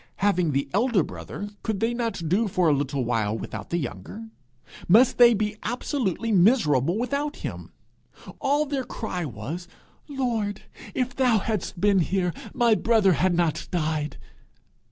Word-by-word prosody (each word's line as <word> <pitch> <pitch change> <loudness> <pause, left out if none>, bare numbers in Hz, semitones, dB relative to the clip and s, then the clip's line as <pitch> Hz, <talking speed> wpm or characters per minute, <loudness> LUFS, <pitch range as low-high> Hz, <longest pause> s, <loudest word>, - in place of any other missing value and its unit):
Having 185 -5 +1
the 140 +1 0
elder 215 -3 +3
brother, 205 - -7
could 220 -3 -2
they 230 +3 +1
not 230 -8 -3
do 205 +7 +2
for 180 -3 +1
a 155 - +5
little 140 -2 -1
while 110 -2 0
without 105 -2 -7
the 170 - 0
younger? 155 - -6 0.6
Must 235 +9 +5
they 240 -1 +8
be 210 0 -2
absolutely 230 - -2
miserable 175 - +3
without 280 +5 -2
him? - - -7 0.7
All 290 +2 +1
their 275 -2 -2
cry 215 -8 -4
was, 145 - -6 0.4
'Lord, 235 -8 -2 0.3
if 250 -1 -1
thou 250 -4 +3
hadst 205 -3 -3
been 200 0 +4
here, 180 0 0 0.2
my 240 -3 +3
brother 215 -3 +3
had 175 +3 +1
not 170 -3 0
died!' 155 -4 -2
200 Hz, 150 wpm, -25 LUFS, 165-235 Hz, 0.7 s, they